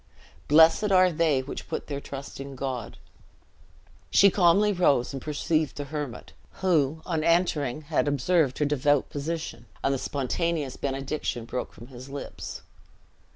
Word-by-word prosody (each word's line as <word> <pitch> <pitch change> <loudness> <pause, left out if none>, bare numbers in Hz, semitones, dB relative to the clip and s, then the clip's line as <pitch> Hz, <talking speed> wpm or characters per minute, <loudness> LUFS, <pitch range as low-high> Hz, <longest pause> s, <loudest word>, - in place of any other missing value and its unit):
"Blessed 160 +7 +5
are 185 -1 +5
they 155 -5 +2
which 135 - -7
put - - -3
their 140 -1 -5
trust 140 -1 -8
in 140 0 -7
God!" 130 -3 -4 1.1
She 200 -1 +6
calmly 200 +3 +4
rose, 145 -9 +2
and 135 - -5
perceived 155 +1 -1
the 145 - -3
hermit; 145 -4 -6 0.2
who, 160 -4 +1
on 165 -3 -1
entering, 155 -5 +1
had 150 0 0
observed 145 0 +2
her 150 - +1
devout 145 0 +1
position, 145 -6 -5 0.2
and 135 - +2
the 135 - -1
spontaneous 145 +1 -2
benediction 135 -3 -3
broke 125 - -4
from 120 - -12
his 130 +1 -11
lips. 140 +1 -7
145 Hz, 145 wpm, -26 LUFS, 135-165 Hz, 1.1 s, She